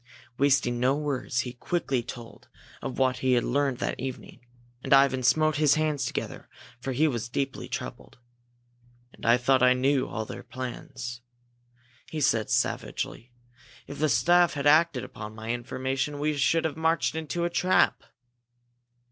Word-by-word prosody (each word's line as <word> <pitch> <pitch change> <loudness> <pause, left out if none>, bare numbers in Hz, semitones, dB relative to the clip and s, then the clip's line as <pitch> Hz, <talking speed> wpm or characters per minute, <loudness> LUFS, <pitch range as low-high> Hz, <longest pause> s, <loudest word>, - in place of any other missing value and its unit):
Wasting 135 -3 +2
no 130 +3 +3
words, 140 -4 -1
he 125 -1 -6
quickly 135 -1 -1
told 115 0 -10 0.3
of 135 - -5
what 130 -1 +2
he 130 0 +1
had 120 - +3
learned 140 -1 0
that - - -3
evening. 130 -1 -7 0.4
And - - +2
Ivan 135 -1 +5
smote 155 +4 +3
his 150 -2 +4
hands 155 -2 0
together - - -5 0.3
for 135 +2 -4
he 145 +5 +2
was 120 -4 -3
deeply 135 +2 -3
troubled. - - -7 1.0
"And - - -8
I 120 +1 +6
thought 130 +1 +2
I 125 0 +6
knew 130 +1 +1
all 110 +1 -4
their - - -8
plans!" 125 -1 -7 0.9
he 155 - -4
said, 115 -7 +1
savagely. 120 +2 -2 0.5
"If 140 - -9
the 155 0 +2
staff 175 +9 +4
had 140 0 -3
acted 155 -3 +4
upon 110 0 -8
my 110 +1 -4
information, 130 +4 -3
we 150 +1 0
should 160 +4 +2
have 160 - -1
marched 160 -1 +1
into 160 +2 -2
a 175 - -2
trap!" 185 +2 +2
135 Hz, 155 wpm, -27 LUFS, 125-150 Hz, 1.0 s, I